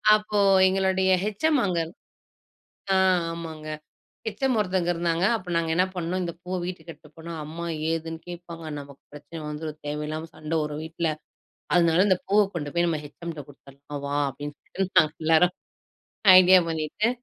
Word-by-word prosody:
அப்போ 210 -1 -1 0.3
எங்களோடய 190 0 +2
H. 210 +7 -2
M 295 -4 +3
அங்க 180 -3 0 1.2
அ - - +4 0.4
ஆமாங்க. 160 -2 -7 0.6
ஹெச். 215 +3 -5
எம் 255 -3 +1
ஒருத்தங்க 185 -3 0
இருந்தாங்க. 170 +1 +1
அப்ப 185 - -14
நாங்க 165 -1 0
என்ன 180 +2 +4
பண்ணோம். 180 +1 -2
இந்தப் 170 0 -6
பூவ 185 +1 -2
வீட்டுக்கு 175 -2 -6
எடுத்துட்டு 150 0 -21
போனா 165 +1 -7
அம்மா 165 +3 -6 0.3
ஏதுன்னு 165 0 -3
கேப்பாங்க. 170 -1 -8
நமக்குப் 140 -1 -13
பிரச்சனை 155 +2 -9
வந்துரும். 155 0 -6
தேவையில்லாம 150 +2 -4
சண்டை 155 +1 -2
வரும் 150 0 -4
வீட்ல. 165 0 -2 0.7
அதனால 170 +1 +4
அந்தப் 185 -3 +1
பூவ 210 +1 +6
கொண்டு 145 -3 -4
போய் 175 0 +2
நம்ம 155 -2 -1
ஹெச். 145 - -18
எம் 170 - -3
குடுத்தரணும் 140 +1 -10
வா. 145 +1 -1
அப்டின்னு 145 +7 -5
நாங்க 155 -1 -1
எல்லாரும் 165 +3 +4 0.8
ஐடியா 185 0 +7
பண்ணிட்டு. 160 +7 -1
165 Hz, 155 wpm, -25 LUFS, 155-185 Hz, 1.2 s, ஐடியா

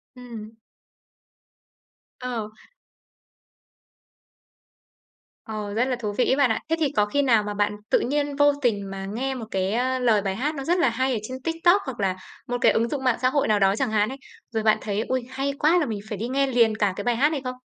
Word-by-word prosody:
Ừm. 230 -4 -9 1.7
Ờ. 240 -4 -4 3.0
Ờ, 210 -2 -5
rất 235 +4 +2
là 260 -1 -1
thú 220 -4 -4
vị 250 - +3
ấy - - +4
bạn 275 -2 +3
ạ. 220 - 0
Thế 325 - +3
thì 295 -4 +1
có 210 - +4
khi 285 +8 0
nào 230 -6 +3
mà 210 0 -4
bạn 205 0 0
tự - - +4
nhiên 285 +2 -1
vô 290 0 +4
tình 205 -6 0
mà 195 0 -5
nghe 255 +7 -3
một 235 - -6
cái, 190 0 0
a, 255 +2 0
lời 225 -4 +3
bài 190 -1 -2
hát 295 +6 -2
nó 275 - -4
rất 350 +6 +1
là 270 - +4
hay 260 +3 0
ở 225 - -1
trên 260 0 -7
TikTok 330 +6 +3
hoặc 255 -4 -6
là 190 -2 0 0.3
một 245 - -1
cái - - +6
ứng 230 +1 +1
dụng 275 0 -3
mạng 255 -3 +2
xã 255 - +3
hội 285 +1 +1
nào 215 -1 +3
đó 195 0 +3
chẳng 250 0 -1
hạn 210 0 +2
ấy, 270 - -7 0.3
rồi 220 -1 -1
bạn 215 -1 +4
thấy, 205 0 -2
ui, 255 +1 -2
hay 270 +2 -2
quá, 320 +4 +4
là 310 - +1
mình 215 -3 -3
phải 210 - -4
đi 225 +4 -3
nghe 275 +2 +1
liền 235 -4 +3
cả 205 -3 +1
cái 205 - -5
bài 240 +1 +1
hát 285 +6 +3
này 295 -4 -2
không? 255 0 -4
245 Hz, 230 wpm, -24 LUFS, 215-270 Hz, 3.0 s, cái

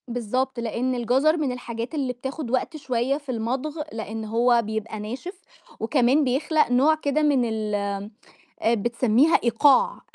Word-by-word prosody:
بالضبط. 245 +2 -2
لأن 235 +2 -1
الجَزر 260 +7 +2
من 290 -5 -1
الحاجات 240 +2 -5
اللي 265 -4 -1
بتاخد 265 +1 -6
وقت 265 +5 -1
شوية 260 -1 -1
في 290 -2 -14
المضغ 255 +7 -3
لأن 220 0 -5
هو 235 +2 +3
بيبقى 220 0 -4
ناشف، 265 - -7 0.4
وكمان 255 +4 +2
بيخلق 275 +2 +1
نوع 275 +6 +4
كده 305 -1 -1
من 285 -5 +3
ال 215 -2 -2 0.9
آآ، 225 - +3
بتسميها 240 +6 +2
إيقاع، 245 +3 +3
250 Hz, 140 wpm, -24 LUFS, 230-280 Hz, 0.9 s, نوع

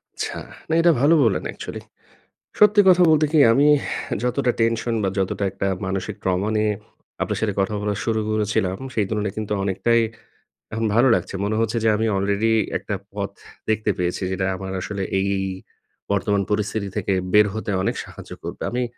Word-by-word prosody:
আচ্ছা, - - -4 0.3
না, - - 0
এটা 170 0 +5
ভালো 145 +4 +5
বললেন 110 -6 +1
অ্যাকচুয়ালি। - - -7 0.8
সত্যি 210 0 +6
কথা 180 -1 +6
বলতে 155 -1 +4
কি? 160 - +4
আমি 140 +5 +4
এহ - - -4
যতটা 125 +1 +1
টেনশন 115 +1 +1
বা, 95 - +1
যতটা 95 +1 -1
একটা 100 +1 -3 0.2
মানসিক 95 -1 -3
ট্রমা 95 +2 0
নিয়ে 105 0 +2 0.5
আপনার - - -2
সাথে 105 -3 0
কথা 95 +2 0
বলা 105 0 -1
শুরু 110 -1 0
করেছিলাম, 105 -3 0 0.2
সেই 110 - +2
তুলনায় 105 -2 -2
কিন্তু 105 -1 -3
অনেকটাই 115 +5 +2 0.7
এখন 110 +1 -1
ভালো 120 +3 +5
লাগছে। - - -3
মনে 105 +1 -1
হচ্ছে 115 +1 0
যে, 115 - +3
আমি 110 +1 0
আলরেডি 100 +3 +1 0.3
একটা 100 - -4 0.2
পথ 100 -1 -3 0.4
দেখতে 110 0 +1
পেয়েছি 90 +1 -2
যেটা 95 0 -1
আমার 95 0 -6
আসলে 100 +1 -4 0.2
এই 100 +1 0 0.8
বর্তমান 100 0 +1
পরিস্থিতি 105 0 -1
থেকে 100 -2 0 0.2
বের 105 0 +7
হতে 110 -1 -3
অনেক - - 0
সাহায্য - - -12
করবে। - - -7
আমি 125 +1 0
105 Hz, 175 wpm, -22 LUFS, 100-115 Hz, 0.8 s, বের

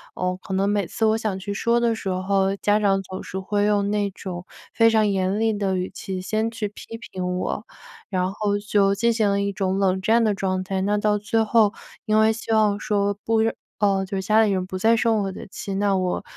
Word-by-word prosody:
嗯， 180 0 -1
可 190 - -4
能 195 +1 +1
每 205 -4 0
次 225 - -1
我 220 0 +3
想 215 -4 -2
去 200 +2 -5
说 235 +3 +1
的 235 -1 +2
时 205 -3 -4
候， 190 +1 +1
家 205 +1 +2
长 195 -2 +2
总 185 +1 -7
是 190 - -7
会 205 +2 0
用 205 -1 +1
那 205 -1 0
种 185 -2 -7 0.3
非 230 0 +5
常 220 -2 +3
严 195 +1 0
厉 225 -1 +2
的 195 -2 -1
语 180 0 -2
气 190 -1 -5
先 220 +4 -1
去 215 -2 -3
批 225 +2 -10
评 180 -5 -4
我， 205 - -3 0.4
然 185 -1 0
后 205 0 -1
就 200 -1 +2
进 235 +2 +2
行 215 -3 +2
了 200 0 +1
一 200 0 -1
种 190 -1 -1
冷 190 -1 +1
战 230 +3 +3
的 215 - +2
状 185 -1 -1
态。 190 0 -2
那 205 +2 +1
到 210 0 +2
最 220 +2 0
后 220 -1 +3 0.3
因 215 -1 +2
为 220 0 +5
希 225 0 -6
望 210 -2 +3
说 205 -1 0
不 225 -1 +2 0.4
呃， 195 -2 +2
就 195 +1 -4
是 - - -1
家 220 +1 +4
里 210 - +2
人 185 -1 -1
不 185 0 -5
再 225 +5 +4
生 225 -2 +2
我 195 - -3
的 - - -9
气， 195 0 -6
那 200 0 +1
我 185 -1 -1
200 Hz, 255 characters per minute, -23 LUFS, 190-215 Hz, 0.4 s, 非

